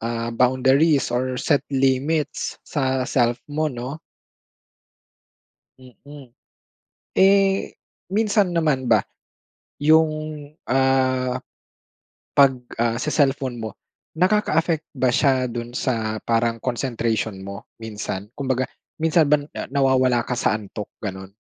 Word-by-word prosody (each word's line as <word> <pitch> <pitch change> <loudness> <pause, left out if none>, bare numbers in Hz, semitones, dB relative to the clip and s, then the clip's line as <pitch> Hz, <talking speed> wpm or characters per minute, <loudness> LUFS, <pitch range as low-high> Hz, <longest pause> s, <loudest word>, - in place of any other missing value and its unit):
ah, 115 0 -3
boundaries 130 +3 +3
or 130 +1 -1
set 145 +3 +2
limits, 135 +3 0
sa 130 -3 -1
self 120 -3 +1
mo 155 +1 0
'no? 130 +3 -6 1.8
Mm. 135 +2 -14 0.9
Eh, 195 0 +3 0.4
minsan 205 -3 +2
naman 150 -6 +1
ba, 110 -3 +5 0.8
yung, 160 +1 +5 0.6
ah, 130 -1 +2 1.0
'pag, 140 -1 +6 0.3
ah, 115 0 +1
se-cellphone 135 -4 0
mo, 110 -1 -4 0.5
nakaka-affect 170 -4 +2
ba 130 -2 +2
siya 130 0 +2
dun 120 0 -6
sa, 110 -4 -1
parang 115 0 +1
concentration 115 -4 -2
mo 100 +1 -8 0.2
minsan? 105 -2 -5
Kumbaga, 130 -2 -1 0.4
minsan 160 0 +4
ba 150 - +6 0.3
nawawala 130 -3 +3
ka 125 - -1
sa - - +2
antok, 105 0 -8
ganun? 95 -2 -6
130 Hz, 105 wpm, -22 LUFS, 120-150 Hz, 1.8 s, pag